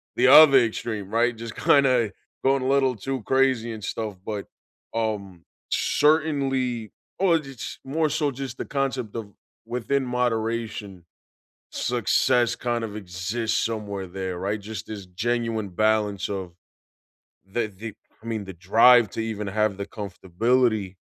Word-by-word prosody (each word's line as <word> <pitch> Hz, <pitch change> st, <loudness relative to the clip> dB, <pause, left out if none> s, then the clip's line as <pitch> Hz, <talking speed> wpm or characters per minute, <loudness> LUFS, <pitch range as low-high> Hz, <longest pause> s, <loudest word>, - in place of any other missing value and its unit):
the 125 Hz, -, +4 dB
other 140 Hz, 0 st, +9 dB
extreme, 110 Hz, -3 st, -2 dB
right, 120 Hz, +1 st, +2 dB
just 115 Hz, 0 st, -8 dB
kinda 130 Hz, -6 st, +3 dB, 0.3 s
going 135 Hz, 0 st, +2 dB
a -, -, -1 dB
little 135 Hz, -2 st, +3 dB
too 135 Hz, +4 st, -4 dB
crazy 130 Hz, -3 st, +2 dB
and 110 Hz, -2 st, -7 dB
stuff, 110 Hz, -1 st, -4 dB
but, 105 Hz, -2 st, -4 dB, 0.5 s
um, 100 Hz, -6 st, -3 dB, 0.2 s
certainly, 135 Hz, -7 st, +1 dB, 0.3 s
or 180 Hz, -4 st, +4 dB
j 135 Hz, -3 st, -10 dB
ch -, -, -7 dB
more 155 Hz, +3 st, 0 dB
so 145 Hz, 0 st, 0 dB
just 135 Hz, 0 st, -6 dB
the -, -, -4 dB
concept 135 Hz, -6 st, -2 dB
of 110 Hz, -3 st, -5 dB, 0.3 s
within 125 Hz, +4 st, -1 dB
moderation. 115 Hz, -6 st, -2 dB, 0.7 s
Success 120 Hz, -1 st, +1 dB
kind 120 Hz, -1 st, -2 dB
of 105 Hz, -2 st, -5 dB
exists 105 Hz, +4 st, -2 dB
somewhere 105 Hz, -4 st, -3 dB
there, 95 Hz, 0 st, -5 dB
right, 100 Hz, +3 st, -2 dB
just 105 Hz, 0 st, -7 dB
this 105 Hz, -3 st, -7 dB
genuine 110 Hz, +2 st, -2 dB
balance 105 Hz, 0 st, +1 dB
of 95 Hz, -4 st, -5 dB, 0.9 s
the 110 Hz, +4 st, -2 dB
the, 105 Hz, +1 st, -8 dB, 0.3 s
I -, -, -13 dB
mean, 110 Hz, -3 st, -3 dB
the 95 Hz, -, -8 dB
drive 115 Hz, +6 st, +5 dB
to -, -, -5 dB
even 110 Hz, -2 st, -3 dB
have 105 Hz, 0 st, 0 dB
the 100 Hz, -, -4 dB
comfortability 105 Hz, +1 st, 0 dB
115 Hz, 140 wpm, -25 LUFS, 100-125 Hz, 0.9 s, other